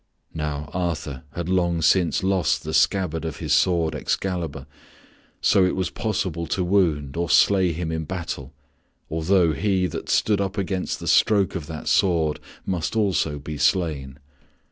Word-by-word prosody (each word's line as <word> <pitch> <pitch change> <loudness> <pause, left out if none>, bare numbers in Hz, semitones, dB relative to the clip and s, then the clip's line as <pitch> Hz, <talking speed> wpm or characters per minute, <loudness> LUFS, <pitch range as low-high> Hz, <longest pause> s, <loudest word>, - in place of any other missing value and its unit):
Now 75 -2 -3
Arthur 80 -7 -3
had 85 +1 -4
long 85 -3 +1
since 90 +2 +3
lost 95 -2 +1
the 80 - -5
scabbard 80 0 +1
of 80 -3 -4
his 75 -4 -1
sword, 85 0 +2
Excalibur, 85 -7 -3 0.8
so 95 - +4
it 90 - +1
was 95 -2 -2
possible 95 -7 -2
to 95 - -1
wound 80 -7 +1
or 85 0 -1
slay 95 -1 +4
him 80 0 -3
in 80 0 -3
battle, 85 +1 -5 0.6
although 80 +1 +2
he 95 +4 +1
that 90 - -5
stood 105 -2 +2
up 100 +1 -3
against 95 -1 -2
the - - -7
stroke 100 -3 +3
of 85 -6 -5
that 80 -1 -7
sword 80 -5 +2 0.3
must 90 +1 -2
also 95 -8 +1
be 75 +1 -7
slain. 70 -8 0
85 Hz, 155 wpm, -23 LUFS, 80-95 Hz, 0.8 s, so